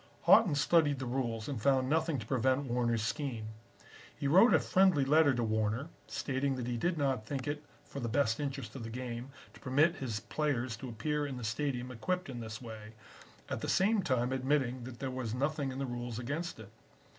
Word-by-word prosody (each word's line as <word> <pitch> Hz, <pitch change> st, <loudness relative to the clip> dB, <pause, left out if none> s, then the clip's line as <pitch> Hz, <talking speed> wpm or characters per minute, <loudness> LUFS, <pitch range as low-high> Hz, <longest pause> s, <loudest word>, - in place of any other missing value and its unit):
"Haughton 190 Hz, -10 st, +6 dB
studied 145 Hz, 0 st, +3 dB
the 130 Hz, -, -4 dB
rules 120 Hz, -3 st, -2 dB
and 135 Hz, -7 st, -4 dB
found 130 Hz, +1 st, +3 dB
nothing 160 Hz, +1 st, +1 dB
to 115 Hz, -, -6 dB
prevent 130 Hz, +3 st, +1 dB
Warner's 120 Hz, -2 st, 0 dB
scheme. 115 Hz, -3 st, -3 dB, 0.7 s
He 140 Hz, -, -1 dB
wrote 190 Hz, -, +7 dB
a -, -, +6 dB
friendly 185 Hz, -7 st, +3 dB
letter 150 Hz, +1 st, +5 dB
to 120 Hz, -, 0 dB
Warner, 110 Hz, +6 st, 0 dB, 0.2 s
stating 135 Hz, 0 st, -1 dB
that 125 Hz, -2 st, -4 dB
he 120 Hz, 0 st, -2 dB
did 170 Hz, +8 st, 0 dB
not 135 Hz, -7 st, 0 dB
think 135 Hz, -1 st, -3 dB
it 145 Hz, +1 st, -3 dB, 0.2 s
for 140 Hz, -, -7 dB
the 120 Hz, -3 st, -2 dB
best 115 Hz, -2 st, +1 dB
interest 135 Hz, -6 st, -4 dB
of 130 Hz, -, -6 dB
the 115 Hz, -, -5 dB
game 120 Hz, +1 st, -5 dB, 0.2 s
to -, -, -15 dB
permit 145 Hz, +6 st, +2 dB
his 115 Hz, -5 st, -3 dB
players 130 Hz, -6 st, -1 dB
to 130 Hz, +2 st, -7 dB
appear 150 Hz, +6 st, -1 dB
in 135 Hz, -2 st, -5 dB
the 125 Hz, -, -6 dB
Stadium 125 Hz, +2 st, -2 dB
equipped 180 Hz, +8 st, -2 dB
in 125 Hz, -2 st, -5 dB
this 110 Hz, -1 st, -6 dB
way, 110 Hz, -2 st, -9 dB, 0.5 s
at -, -, -4 dB
the -, -, -3 dB
same 205 Hz, +2 st, +3 dB
time 130 Hz, -7 st, 0 dB
admitting 130 Hz, -2 st, 0 dB
that 125 Hz, -2 st, -8 dB
there 135 Hz, 0 st, -3 dB
was 125 Hz, -3 st, -3 dB
nothing 140 Hz, +1 st, -1 dB
in 130 Hz, -, -6 dB
the 135 Hz, -, -1 dB
rules 120 Hz, -2 st, -4 dB
against 145 Hz, +6 st, -4 dB
it. 105 Hz, -3 st, -10 dB
130 Hz, 205 wpm, -32 LUFS, 120-145 Hz, 0.7 s, wrote